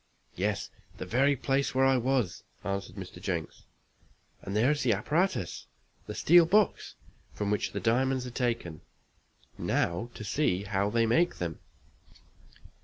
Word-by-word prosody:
"Yes 100 +1 -2 0.3
the - - -5
very 140 +4 +3
place 135 +1 0
where 135 0 +4
I 135 0 +4
was," 125 -5 0 0.2
answered 100 0 -4
Mr. 90 -2 -9
Jenks, 90 -5 -4 0.8
"and 100 - -5
there 120 +6 +4
is 150 - -1
the 120 -3 +3
apparatus 150 - -1 0.4
the - - -5
steel 170 0 +6
box 210 +2 +2 0.4
from 105 -1 -2
which 105 - 0
the - - -3
diamonds 130 +2 +1
are 125 - -6
taken 115 -10 -2 0.8
now 85 +8 0
to - - -7
see 100 -4 0
how 100 0 0
they 115 +1 +2
make 165 +10 +2
them." 85 -3 -4
115 Hz, 145 wpm, -29 LUFS, 100-135 Hz, 0.8 s, steel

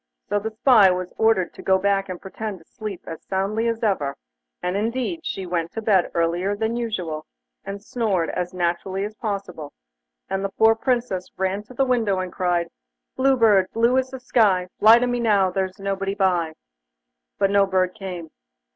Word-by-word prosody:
So 205 +1 +1
the 220 +2 -3
spy 220 -2 +5
was 180 0 -2
ordered 220 -5 +2
to - - -11
go 190 0 +3
back 195 0 0
and 180 -1 -5
pretend 210 +1 -6
to 165 - -20
sleep 210 -2 -7
as 165 - -7
soundly 200 +4 -1
as 230 0 -2
ever, 150 -10 0 0.5
and 180 +1 -1
indeed 245 - -1
she 195 -8 -4
went 170 -1 -2
to 225 - -4
bed 195 -5 +3
earlier 175 +4 +1
than 220 +2 -1
usual, 180 -10 -3 0.4
and 200 +1 -6
snored 210 -9 -1
as 180 0 -3
naturally 185 +2 -1
as 210 - -6
possible, 195 -9 -5 0.5
and 195 0 -2
the 195 - -1
poor 220 +3 +4
Princess 235 -6 -1
ran 190 +2 -1
to 255 - -14
the 270 - +2
window 230 -6 +1
and 185 -1 -4
cried: 175 -2 0 0.5
'Blue 265 0 +3
Bird, 205 -5 +5
blue 235 +2 +3
as 260 0 -2
the 260 0 -7
sky, 200 -7 +2
Fly 220 +2 +8
to 245 - +1
me 245 0 -1
now, 205 -5 +3
there's 190 0 -2
nobody 195 0 -2
by!' 180 -5 +1 0.8
But 195 0 +2
no 200 -1 +4
bird 185 -1 +1
came. 180 -6 -7
195 Hz, 185 wpm, -23 LUFS, 185-225 Hz, 0.8 s, Fly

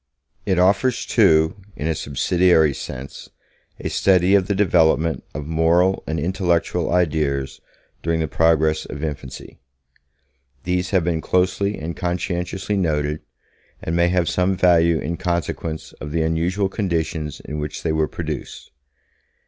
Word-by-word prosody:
It 95 - +2
offers, 100 +8 +2
too, 80 +3 +3 0.2
in 75 - -5
a 80 - +1
subsidiary 80 +1 +2
sense, 65 +1 -8 0.5
a - - -4
study 95 0 +3
of 95 -2 +4
the 100 - 0
development 80 -6 +2
of 75 0 -4
moral 85 +4 +2
and 80 0 -2
intellectual 85 0 0
ideas 75 -6 0 0.4
during 80 0 0
the 80 - 0
progress 80 0 +2
of 70 +2 -7
infancy. 70 -4 -7 1.0
These 90 0 -1
have 95 -4 +2
been 85 -1 -1
closely 95 +4 0
and 80 +2 -5
conscientiously 90 +3 -2
noted, 75 -4 -1 0.6
and 80 - -2
may 85 0 +3
have 90 -1 +1
some 90 +1 +1
value 85 -2 +4
in 85 +3 -3
consequence 85 -2 -3
of 75 - -6
the 80 +1 0
unusual 85 +5 0
conditions 80 -6 -2
in 75 +1 -6
which 75 0 -5
they 80 - 0
were 80 0 +1
produced. - - -6
85 Hz, 140 wpm, -21 LUFS, 80-90 Hz, 1.0 s, of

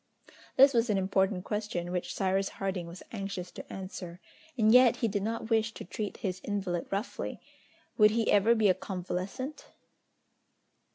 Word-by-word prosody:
This 275 +1 +7
was 235 0 +2
an 205 - +2
important 190 0 +1
question, 205 -5 -3
which 180 -1 -3
Cyrus 195 0 +1
Harding 190 -3 -2
was 170 +2 -10
anxious 195 -4 -5
to - - -10
answer, 185 -2 -7 0.4
and 220 -1 +5
yet 250 -2 +7
he 230 - 0
did 205 -1 -1
not 225 +2 -3
wish 225 0 +2
to - - -7
treat 210 -2 -5
his 185 -2 -3
invalid 190 -4 -2
roughly! 200 +5 -3 0.6
would 210 0 +8
he 225 +1 +1
ever 210 +3 +5
be 220 -2 +3
a 185 - +6
convalescent? 190 - -5
200 Hz, 160 wpm, -30 LUFS, 185-220 Hz, 0.6 s, would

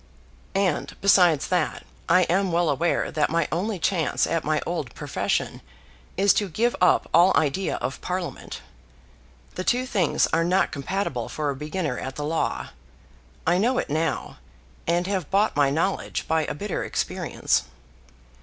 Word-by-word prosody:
"And, 195 -5 0
besides 180 -6 +4
that, 180 -4 -1 0.2
I 180 +2 +6
am 190 +2 +1
well 170 -2 +2
aware 165 +5 0
that 150 -1 +1
my 165 -1 +1
only 195 +5 -1
chance 170 -1 +1
at 165 -1 -1
my 155 0 +1
old 155 -9 -4
profession - - -2 0.6
is 200 +1 +5
to 205 -2 0
give 235 +8 +1
up 180 - +4
all 175 +3 +6
idea 160 +5 0
of 135 - -4
Parliament. 180 -6 -5 0.9
The 185 - -4
two 250 +5 +1
things 195 - +2
are 165 +1 +3
not 185 +3 +2
compatible 145 - -3
for 150 -2 -2
a - - -5
beginner 150 -1 -3
at 135 0 -6
the 145 - -4
law. 160 +2 -1 0.8
I 175 +2 +3
know 245 +5 +2
it - - -2
now, 155 -2 -1 0.5
and 170 +1 +1
have 190 -5 -2
bought 205 +3 +2
my 145 -1 +4
knowledge 165 +7 -1
by 160 -1 +1
a - - -4
bitter 200 +4 -3
experience." - - -1
170 Hz, 155 wpm, -25 LUFS, 155-190 Hz, 0.9 s, I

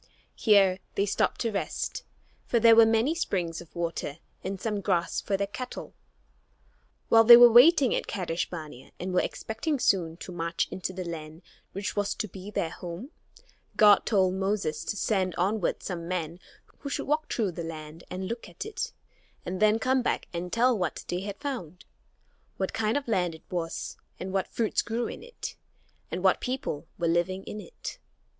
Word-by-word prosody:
Here 195 -4 +4 0.2
they 200 - +2
stopped 205 - 0
to 230 - 0
rest, 200 - -3 0.5
for 235 - +2
there 230 0 +7
were 225 0 +8
many 225 +7 +3
springs 175 - -2
of 170 - -16
water 170 -4 -3 0.3
and 190 0 -4
some 210 -1 -2
grass 175 -4 0
for 195 - -1
their 200 - 0
cattle. 230 +5 -7 1.2
While 225 0 +7
they 235 +1 +11
were 240 0 +9
waiting 265 +2 +7
at - - -1
Kadesh 180 -4 -2
barnea 155 -7 -9
and 185 +1 -3
were 180 - +4
expecting 280 +7 -2
soon 170 -9 +1
to 185 - -8
march 170 -1 -1
into 185 0 -3
the 185 0 -5
land 160 0 -7 0.3
which 195 +2 -3
was 205 -1 0
to 215 - -3
be 190 +1 -9
their 170 -5 -2
home, 180 - -7 0.7
God 210 -2 +6
told 190 -4 +3
Moses 190 -5 -1
to 205 - -3
send 190 -5 0
onward 195 +2 0
some 170 -3 -4
men 170 -1 -3 0.4
who 280 - -6
should - - -2
walk 300 +1 0
through 210 -6 0
the 170 0 -6
land 160 0 -8
and 185 +1 -4
look 230 +3 -5
at - - -7
it, 435 - -4 0.5
and 180 +1 -3
then 215 +1 +5
come 255 +3 +2
back - - -1
and 175 +1 -4
tell 245 +2 +3
what 180 -5 -3
they 175 - -1
had 200 +1 -5
found; 205 - -6 0.7
what 190 - -2
kind 220 +3 +1
of 285 - -4
a - - -2
land 180 -5 +1
it 160 - -16
was, 170 -2 -3 0.2
and 185 +1 -5
what 195 -2 0
fruits 225 -2 0
grew 235 +1 -2
in - - -6
it, 480 +1 -7 0.5
and 180 - -4
what 190 - +4
people 250 - -3
were 170 - 0
living 175 +3 +1
in 210 - -6
it. 485 - -8
195 Hz, 185 wpm, -28 LUFS, 175-225 Hz, 1.2 s, they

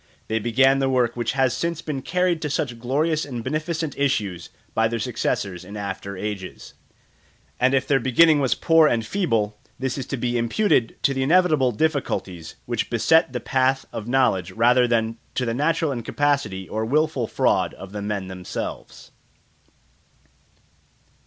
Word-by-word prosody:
They 110 0 +1
began 130 +5 +3
the 135 -1 +1
work 125 -3 +1
which 120 +1 -1
has 130 -2 +2
since 170 -1 -3
been 145 -4 -4
carried 180 +1 0
to 150 - -2
such 130 -5 -2
glorious 150 +6 0
and 120 -5 -6
beneficent 155 +2 -2
issues 105 -11 -1 0.2
by 110 0 +2
their 115 +1 -2
successors 100 -6 -2
in 100 +3 -9
after 100 -1 -5
ages; 100 -2 -6 0.9
and 130 +2 +3
if 135 - 0
the 135 -2 +3
beginning 150 +4 +4
was 135 -3 +1
poor 165 -1 +4
and 115 -5 0
feeble, 110 - -1 0.2
this 130 +1 -3
is 130 - -5
to 135 - -3
be 120 0 -1
imputed 120 - +1
to 140 - +3
the 135 - -2
inevitable 155 -3 +3
difficulties 100 - -2
which 115 -3 -2
beset 160 +6 +3
the 125 - -3
path 130 +1 +1
of 110 - -5
knowledge 120 -9 +1
rather 125 +3 +4
than 115 -1 0 0.2
to 125 - 0
the 115 - -1
natural 150 +3 +1
incapacity 135 -5 -1
or 110 +1 -3
wilful 140 0 +1
fraud - - +1
of 95 - -10
the 105 0 -5
men 100 -2 -3
themselves. 90 -1 -7
125 Hz, 160 wpm, -23 LUFS, 110-145 Hz, 0.9 s, beginning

